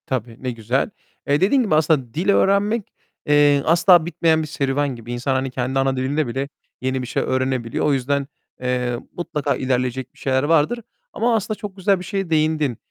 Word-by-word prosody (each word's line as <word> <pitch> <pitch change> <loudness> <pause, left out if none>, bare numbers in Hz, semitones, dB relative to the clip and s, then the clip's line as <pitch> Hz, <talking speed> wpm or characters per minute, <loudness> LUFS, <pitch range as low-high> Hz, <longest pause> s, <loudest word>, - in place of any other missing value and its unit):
Tabii, 120 -5 -4
ne 130 - -1
güzel. 115 - -1 0.4
Eee, 145 +3 +2
dediğin 235 +8 +4
gibi 195 -9 +1
aslında 150 -6 +1
dil 180 +5 -1
öğrenmek, 200 +2 +2 0.3
eee, 145 -1 +4
asla 175 0 +5
bitmeyen 165 -2 +2
bir 155 - -4
serüven 140 -2 -1
gibi. 120 0 -9
İnsan, 125 +3 -1
hani, 130 0 -1
kendi 130 +1 -1
ana 135 0 +1
dilinde 140 +3 0
bile 135 +4 -3 0.3
yeni 130 0 -1
bir 125 - -5
şey 125 - -1
öğrenebiliyor. 130 -2 -1
O 150 - +3
yüzden, 140 +1 0 0.3
eee, 125 -1 -1 0.2
mutlaka 155 -4 -1
ilerleyecek 130 0 -2
bir - - -22
şeyler 130 0 +1
vardır. 160 +9 +2 0.3
Ama 235 0 +1
aslında 215 0 -2
çok 205 -2 -7
güzel 195 0 +2
bir 180 - -8
şeye 195 -1 -3
değindin. 155 -5 +1
140 Hz, 185 wpm, -21 LUFS, 130-165 Hz, 0.4 s, asla